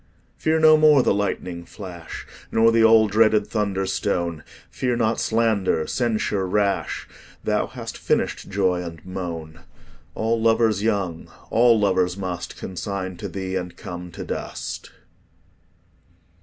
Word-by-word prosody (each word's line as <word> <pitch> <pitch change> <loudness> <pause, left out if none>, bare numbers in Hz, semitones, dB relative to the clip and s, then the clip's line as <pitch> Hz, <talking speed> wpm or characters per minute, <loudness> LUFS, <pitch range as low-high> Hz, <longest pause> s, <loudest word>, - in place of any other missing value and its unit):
Fear 160 0 +1
no 155 0 +8
more 150 -3 +6
the - - +3
lightning 90 -3 -2
flash 90 -3 -9 0.3
Nor 115 0 +5
the 115 0 +4
all 110 -1 +6
dreaded 110 0 +4
thunder 100 -3 -1
stone; 85 -5 -1 0.3
Fear 125 -2 -1
not 115 -1 +1
slander, 110 -8 +1
censure 110 -4 0
rash; 100 +1 0 0.4
Thou - - +1
hast - - -8
finished - - -1
joy 95 -2 +1
and 85 -1 -9
moan: 85 -4 -6 0.6
All 115 +1 0
lovers 110 -2 +3
young, 100 -7 -1 0.2
all 115 -1 +5
lovers 95 -2 +1
must 90 -3 -5
Consign 95 -1 -5
to - - -5
thee, 95 -1 -4
and 90 -2 -4
come 90 0 -7
to - - -6
dust. - - -5
100 Hz, 130 wpm, -23 LUFS, 90-115 Hz, 0.6 s, no